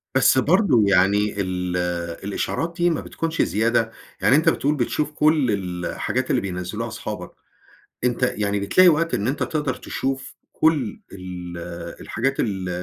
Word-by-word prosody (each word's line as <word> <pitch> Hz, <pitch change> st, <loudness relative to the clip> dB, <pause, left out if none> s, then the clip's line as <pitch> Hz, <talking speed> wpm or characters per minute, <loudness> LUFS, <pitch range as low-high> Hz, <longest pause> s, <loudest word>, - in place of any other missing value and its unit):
بس 130 Hz, 0 st, +5 dB
برضه 150 Hz, -, +4 dB
يعني 100 Hz, +2 st, +3 dB
ال 90 Hz, -1 st, -2 dB, 0.5 s
الإشعارات 135 Hz, -, -2 dB
دي 175 Hz, 0 st, +3 dB
ما 165 Hz, -, -1 dB
بتكونش 165 Hz, 0 st, -2 dB
زيادة؟ 115 Hz, +1 st, +1 dB, 0.3 s
يعني 130 Hz, -, +5 dB
أنت 160 Hz, +3 st, +4 dB
بتقول 150 Hz, -1 st, +1 dB
بتشوف 145 Hz, +3 st, -1 dB
كل 150 Hz, -4 st, +3 dB
ال 90 Hz, -3 st, -3 dB
الحاجات -, -, -2 dB
اللي -, -, +2 dB
بينزّلوها 90 Hz, -2 st, -4 dB
أصحابك، -, -, -6 dB, 0.7 s
أنت 125 Hz, 0 st, 0 dB
يعني 100 Hz, -1 st, 0 dB
بتلاقي 180 Hz, -, +5 dB
وقت 165 Hz, +1 st, +1 dB
إن 100 Hz, -, 0 dB
أنت 135 Hz, -, 0 dB
تقدر 150 Hz, -4 st, -1 dB
تشوف 135 Hz, 0 st, -4 dB, 0.2 s
كل 150 Hz, -9 st, +1 dB
ال 90 Hz, -2 st, -7 dB, 0.4 s
الحاجات 135 Hz, +4 st, -1 dB
ال 95 Hz, -4 st, -1 dB
120 Hz, 145 wpm, -23 LUFS, 100-150 Hz, 0.7 s, بس